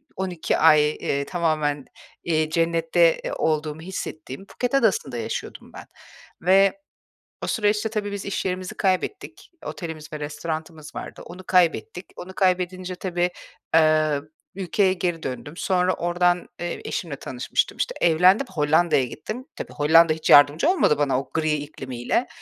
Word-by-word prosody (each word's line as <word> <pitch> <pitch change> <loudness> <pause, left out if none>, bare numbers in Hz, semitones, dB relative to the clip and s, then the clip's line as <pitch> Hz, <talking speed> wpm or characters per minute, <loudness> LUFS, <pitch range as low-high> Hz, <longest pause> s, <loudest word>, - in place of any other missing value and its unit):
12 185 -3 -2
ay, 155 -2 +5
eee, 140 -1 -2
tamamen, 155 -5 -1 0.4
eee, 155 -2 0
cennette, 165 0 +2
eee, - - -2
olduğumu 155 0 -1
hissettiğim 160 -2 -7
Phuket 245 +5 -4
Adası'nda 195 - +1
yaşıyordum - - -6
ben - - -10 0.6
ve 195 - +4 0.6
o - - -2
süreçte 210 0 +1
tabii 210 -2 -3
biz 200 -1 -5
iş 200 - -3
yerimizi 185 +2 -3
kaybettik. 190 - -2
Otelimiz 160 -4 -7
ve 150 - -5
restoranımız 155 +1 -6
vardı. - - -7
Onu 180 +2 -10
kaybettik. 180 -1 +1
Onu 190 +1 -9
kaybedince 185 -1 0
tabii, 180 -1 -1 0.5
eee, 155 -2 +3 0.3
ülkeye 190 0 +1
geri 175 -3 -2
döndüm. 135 +3 -5
Sonra 185 -1 +1
oradan, 175 +1 +1
eee, 175 0 -4
eşimle 160 -6 -4
tanışmıştım, 130 -1 -2
işte. - - -2
Evlendim, 180 +9 +4
Hollanda'ya 155 -2 +2
gittim. 220 - -7
Tabii - - -7
Hollanda 160 +2 +5
hiç 155 - -4
yardımcı 145 - +6
olmadı 350 - +3
bana, 140 -3 +1
o - - -15
gri 155 -1 0
iklimiyle, 140 - -3
170 Hz, 140 wpm, -23 LUFS, 155-185 Hz, 0.6 s, yardımcı